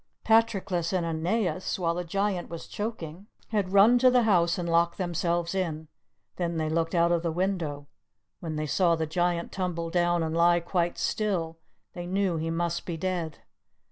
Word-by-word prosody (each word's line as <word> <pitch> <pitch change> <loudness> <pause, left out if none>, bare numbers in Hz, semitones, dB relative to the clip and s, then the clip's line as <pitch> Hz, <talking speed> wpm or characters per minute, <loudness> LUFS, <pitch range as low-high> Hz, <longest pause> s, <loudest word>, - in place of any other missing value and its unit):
Patroclus 200 -7 +2
and 180 -2 0
Aeneas, 180 +4 -1
while 170 -3 0
the 180 +1 -3
Giant 195 +1 -1
was 170 -1 -7
choking, 200 -4 -6 0.2
had 205 -4 -1
run 210 +5 +6
to 255 +1 +6
the 250 -1 +4
house 175 -6 +3
and 175 -1 -3
locked 170 0 +2
themselves 175 -1 -1
in; 160 -5 -3 0.5
then 170 -2 -2
they 155 -1 -1
looked 165 +2 0
out 170 0 +3
of 170 -1 +2
the 165 -1 -1
window; 165 -5 -2 0.5
when 160 -2 -5
they 155 0 -2
saw 170 +2 +2
the 160 -1 -1
Giant 175 +1 -1
tumble 170 -3 -3
down 175 -1 +2
and 160 0 -2
lie 170 +1 +4
quite 175 0 -1
still, 170 -6 -1 0.3
they 175 0 -6
knew 190 -2 0
he 160 +1 -2
must 170 +1 -1
be 170 -2 -3
dead. 170 -3 -3
175 Hz, 175 wpm, -27 LUFS, 165-190 Hz, 0.5 s, run